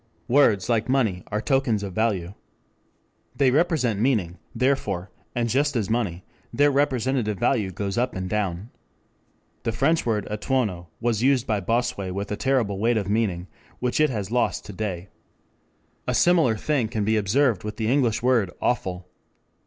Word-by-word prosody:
"Words, 120 -7 +4
like 115 0 0
money, 110 -9 +1
are 105 - -2
tokens 135 -7 +1
of 95 -2 -5
value. 100 -4 -1 1.0
They 135 -3 +3
represent 140 - +1
meaning, 105 -8 0 0.2
therefore, 105 -9 0 0.2
and 120 -1 0
just 140 +4 +1
as 110 -3 -1
money, 100 -7 -1 0.3
their 145 +1 +3
representative 130 -5 0
value 120 -3 +1
goes 100 +3 -3
up 125 - -1
and 95 0 -3
down. 100 +1 -2 0.9
The 115 - -1
French 150 +8 +1
word 105 -4 -1
'etonnant' 105 -6 -1
was 115 -2 0
used 130 -1 +3
by 105 -2 0
Bossuet 100 -3 -1
with 100 +1 -4
a - - 0
terrible 115 -5 0
weight 115 +2 +2
of 100 -2 -2
meaning 100 -6 0 0.3
which 125 +2 -1
it 155 0 +4
has 105 -5 -4
lost 125 0 0
to 105 - -8
day. 95 -2 -4 1.0
A - - 0
similar 165 -11 +4
thing 135 -1 0
can 110 -2 -2
be 110 +1 +2
observed 110 +1 +2
with 105 0 -5
the 110 - -2
English 120 -3 +1
word 120 -6 +3
'awful.' 95 -7 -1
110 Hz, 160 wpm, -24 LUFS, 100-130 Hz, 1.0 s, Words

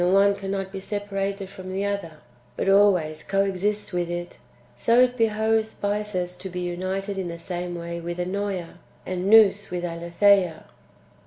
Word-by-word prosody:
149 195 +3 +5
one - - -6 0.2
cannot 190 0 -5
be 195 - -4
separated 200 -1 -3
from 185 -1 -9
the 195 +1 -1
other, 200 -5 -3 0.4
but - - -1
always 185 -6 +4
co 195 +4 +1
exists 200 +2 -1
with 175 -1 -1
it), 175 0 -5 0.4
so 230 +1 +3
it 250 0 +3
behoves 220 -1 +1
Bythus 205 -3 -2
to 190 - -6
be 180 0 -4
united 190 +3 -3
in 185 - -2
the 170 0 -5
same 175 0 -4
way 170 0 -5
with 170 +1 -5
Ennoea, 185 -1 -3 0.3
and 185 +1 -2
Nous 205 -2 +6
with 180 0 -3
Aletheia. 170 +1 +2
190 Hz, 165 wpm, -25 LUFS, 175-200 Hz, 0.4 s, Nous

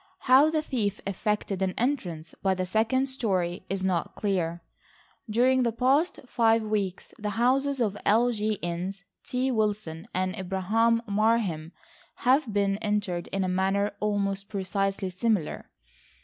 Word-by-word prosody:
How 270 +4 +6
the 310 -1 0
thief 215 -8 -1
effected 200 0 -2
an 190 -1 0
entrance 180 - -2
by 190 -1 +2
the 185 0 -2
second 225 +7 +1
story 185 -9 -1
is 195 -1 -2
not 185 -3 -1
clear. 175 -4 -1 0.7
During 255 +4 +3
the 235 -2 +2
past 270 +9 +1
five 225 -2 +3
weeks 205 -4 -2
the 210 -1 -2
houses 270 +3 +2
of 210 -4 +1
L. 235 +4 +4
G. 215 -1 0
Innes, 180 +3 -3 0.2
T. 255 +1 -1
Wilson 210 -6 -1
and 185 0 -1
Abraham 215 +5 +1
Marheim 200 -6 +1 0.5
have 255 -1 +4
been 200 -1 +1
entered 205 -5 -1
in 195 0 -1
a - - 0
manner 195 +2 +1
almost 200 -1 -1
precisely 195 -1 -1
similar. 200 -3 -1
205 Hz, 140 wpm, -27 LUFS, 190-230 Hz, 0.7 s, How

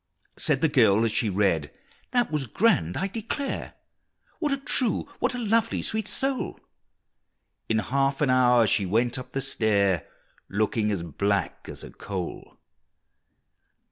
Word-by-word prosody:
Said - - +2
the - - +4
girl 105 +3 +4
as 115 - 0
she 110 - +1
read, 90 -6 +1 0.4
"That 245 -6 +1
was 150 -4 -1
grand, 145 - +2
I 190 - -1
declare! 230 +7 -4 0.6
What 300 -3 0
a 275 - +1
true, 260 -3 +1
what 250 0 0
a - - -3
lovely, 230 -1 +1
sweet 220 -1 -2
soul!" 270 +2 -2 1.1
In 110 - +2
half 135 +6 0
an 140 -4 +2
hour 125 -2 +5
she 100 0 +2
went 120 +6 +1
up 125 - -10
the 135 - -1
stair, 100 - +1 0.4
Looking 105 +1 0
as 100 -5 -2
black 100 +4 -2
as - - -8
a - - -10
coal! 95 -3 -6
125 Hz, 145 wpm, -26 LUFS, -, 1.1 s, hour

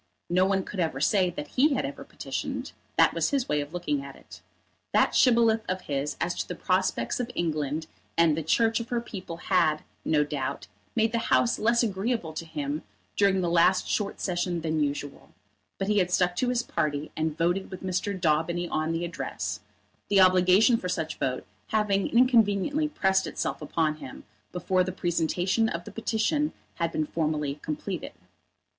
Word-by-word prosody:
No 180 +1 +4
one 190 -1 +1
could 195 - -7
ever 160 -6 0
say 185 +4 +3
that 150 -4 -6
he 280 +2 +3
had - - -1
ever - - -6
petitioned. - - -5 0.3
That - - +5
was - - +1
his 275 -3 0
way 150 - +1
of 145 +1 -7
looking 150 -5 -2
at 140 -1 -9
it. - - -14 0.5
That - - +4
Shibboleth 230 -3 +4
of 185 0 -1
his 145 -1 -3
as 175 - 0
to - - -2
the - - -5
prospects 185 +5 0
of 245 -1 -2
England 155 -2 -1 0.3
and 165 -2 +5
the 165 - -2
Church 225 +9 +2
of 230 +1 -6
her 240 - 0
people 190 -7 -7
had, 170 -4 +1 0.2
no 150 -2 +3
doubt, 145 -3 -4 0.3
made 225 -1 +2
the 230 - 0
House 240 - +3
less 235 +2 +3
agreeable 205 -4 -1
to 165 +2 -5
him 150 -1 -3 0.3
during 195 -2 +3
the 175 - 0
last 180 +2 +4
Short 205 -2 -1
session 175 -2 -1
than 160 -1 -1
usual; 145 0 -5 0.4
but 195 - -2
he 210 0 +3
had 180 -2 +1
stuck 180 0 +2
to 250 - +1
his 245 -1 +1
party, 145 0 -2
and 155 0 -2
voted 175 +3 0
with 185 - -8
Mr. 185 +1 -2
Daubeny 170 +1 +1
on 155 0 -1
the 165 +1 -1
Address, 170 -1 -4 0.5
the 200 - +4
obligation 185 +5 +6
for 180 - -4
such 160 -3 -3
vote 130 -1 -2 0.2
having 205 -3 +1
inconveniently 245 +4 +3
pressed 190 -8 +1
itself - - -3
upon 155 -2 0
him 135 -4 -10 0.3
before 185 +1 +1
the 185 - -3
presentation 180 +5 0
of 170 +1 -4
the - - -9
petition 230 +7 0 0.2
had 170 -1 0
been 155 - -1
formally 150 -2 -2
completed. 160 +3 -4
180 Hz, 180 wpm, -27 LUFS, 155-205 Hz, 0.5 s, obligation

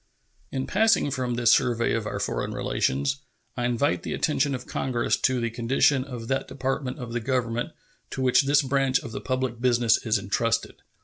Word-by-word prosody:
In 135 -1 -2
passing 215 -8 +2
from 125 -2 -2
this 120 -1 +4
survey 120 -2 +2
of 115 -2 -1
our - - -3
foreign - - -2
relations, 70 +1 0 0.4
I 120 - -2
invite 125 +4 +1
the - - -4
attention 145 -2 +1
of 125 - -7
Congress 120 -3 0
to 130 -1 +1
the 115 -1 -2
condition 130 +3 +2
of 120 -4 -7
that 135 +1 -1
Department 135 0 -3
of 125 -4 -7
the 120 - 0
Government 120 -1 -1 0.4
to 130 - -3
which 130 +1 +4
this 145 +1 +4
branch 135 -1 +2
of 125 - -8
the - - -5
public 130 -2 -2
business 120 -3 +3
is 110 -2 +2
intrusted. 115 +4 -1
125 Hz, 185 wpm, -25 LUFS, 115-135 Hz, 0.4 s, this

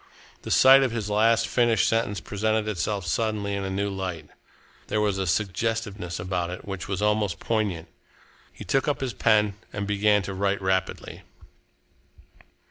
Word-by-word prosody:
The - - -8
sight 135 +1 +7
of 135 - +2
his 110 -3 -4
last 115 +2 +3
finished 120 -4 +2
sentence 110 -3 0
presented 110 +1 -1
itself 100 -1 -2
suddenly 105 +2 -1
in 100 0 -2
a 95 - -3
new 100 +2 -1
light. 90 -6 -5 0.6
There 105 - 0
was 105 -2 0
a 95 - -1
suggestiveness 100 -1 -2
about 90 -1 -2
it 90 - -7
which 95 -2 -6
was 95 0 -2
almost 105 -3 +1
poignant. 105 -8 -2 0.6
He - - -10
took 135 - 0
up 145 - 0
his 130 -4 -3
pen 105 -1 +2
and 100 0 -4
began 105 0 +2
to 95 - -5
write 100 +1 0
rapidly. 95 -1 -2
105 Hz, 160 wpm, -25 LUFS, 95-110 Hz, 0.6 s, sight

